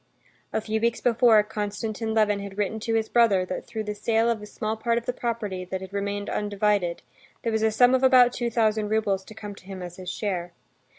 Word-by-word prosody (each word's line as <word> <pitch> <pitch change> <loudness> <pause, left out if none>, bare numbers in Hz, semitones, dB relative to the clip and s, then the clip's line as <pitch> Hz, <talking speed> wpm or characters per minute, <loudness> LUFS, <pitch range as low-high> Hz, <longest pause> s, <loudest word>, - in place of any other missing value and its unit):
A - - -1
few 220 0 -2
weeks 235 0 +1
before, 230 -3 +5
Konstantin 215 +1 -3
Levin 210 -2 +3
had 200 0 -8
written 210 +1 -1
to 225 +1 -1
his 220 -1 +1
brother 215 -7 +3
that 185 - -5
through 220 -1 -4
the 210 0 -3
sale 225 +2 +1
of 230 - -2
the 210 - -9
small 215 +1 -3
part 230 +1 0
of 235 - -3
the 250 - -1
property, 215 -7 -3
that 185 +1 -4
had 190 +1 -10
remained 200 0 -2
undivided, 205 -4 0 0.4
there 230 - 0
was 220 0 0
a 220 - +4
sum 245 +3 +4
of 260 - +3
about 255 -2 +6
two 240 -1 -1
thousand 220 -2 +1
roubles 210 -3 0
to 215 - -12
come 210 -2 -7
to 190 - -16
him 190 -1 -7
as 175 0 -8
his 185 -1 -6
share. 180 -3 -3
215 Hz, 230 wpm, -25 LUFS, 200-225 Hz, 0.4 s, about